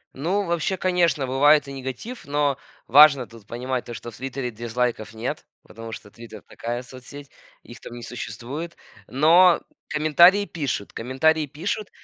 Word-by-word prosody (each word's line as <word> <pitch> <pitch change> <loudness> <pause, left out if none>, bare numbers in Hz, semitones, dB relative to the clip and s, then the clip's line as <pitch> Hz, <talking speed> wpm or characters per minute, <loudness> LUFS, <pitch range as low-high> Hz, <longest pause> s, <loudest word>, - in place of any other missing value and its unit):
Ну 180 +9 -1
вообще, 170 +2 -1
конечно, 170 -7 +1
бывает 145 +2 +4
и - - -7
негатив, 135 - -7
но 145 -1 0 0.3
важно 140 -1 +7
тут 115 -3 -16
понимать 125 +2 -4
то, 120 - -8
что 115 +2 -8
в 115 - -14
"Твитере" 130 0 -4
дизлайков 115 -1 -3
нет, 115 +3 -5 0.2
потому 115 0 -10
что 105 - -9
"Твитер"- 110 -1 -12
такая 120 +1 -5
соцсеть, 130 +3 -12 0.3
их 120 - -13
там - - -11
не 120 - -9
существует. 125 +8 -7 0.3
Но 170 +6 +5 0.3
комментарии 170 +6 +5
пишут, 140 - -4
комментарии 150 +6 +1
пишут. 190 +8 -4
135 Hz, 150 wpm, -23 LUFS, 120-155 Hz, 0.3 s, важно